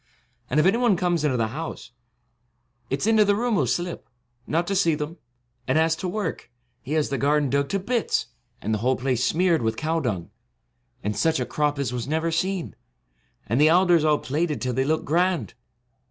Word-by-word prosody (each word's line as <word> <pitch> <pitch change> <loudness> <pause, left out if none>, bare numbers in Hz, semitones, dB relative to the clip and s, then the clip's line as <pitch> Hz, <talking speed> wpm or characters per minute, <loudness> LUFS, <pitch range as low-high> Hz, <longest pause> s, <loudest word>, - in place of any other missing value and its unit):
And 145 - +2
if 155 - +3
any 195 +5 +3
one 235 -7 +3
comes 175 -3 0
into 140 -4 +1
the 115 - +1
66 110 - -6
house, 155 -5 -6 1.0
it 135 - -2
's - - +2
into 220 -1 +5
the 205 0 +2
room 240 +2 0
he - - +2
'11 135 - +1
slip, 175 +8 -3 0.4
not 165 +3 0
to 195 - -2
see 170 -4 +3
them; 150 +3 -5 0.5
and 130 +3 +2
as 160 0 +3
to 185 - -4
work, 190 -2 -4 0.3
he 140 - -5
has 155 -2 +1
the 140 - -2
garden 145 -1 +2
dug 140 0 +1
to 200 - 0
bits, 230 +4 0 0.4
and 110 - -1
the 110 - 0
whole 130 +4 +2
place 125 -1 -1
smeared 170 -2 +2
with 110 -1 -1
cow 160 +4 0
dung; 105 - -3 0.7
and 105 +1 -2
such 160 +3 +1
a 125 - -1
crop 150 +1 -1
as 135 -4 -2
was 120 -1 -3
never 160 +2 0
seen; 180 +1 -2 0.7
and 120 +7 +1
the 155 - +6
alders 175 -2 +4
all 155 -1 +3
plaited 150 +3 -2
till 125 -1 -2
they 130 +2 0
look 155 +2 0
grand. 170 - +1
155 Hz, 210 wpm, -24 LUFS, 130-175 Hz, 1.0 s, the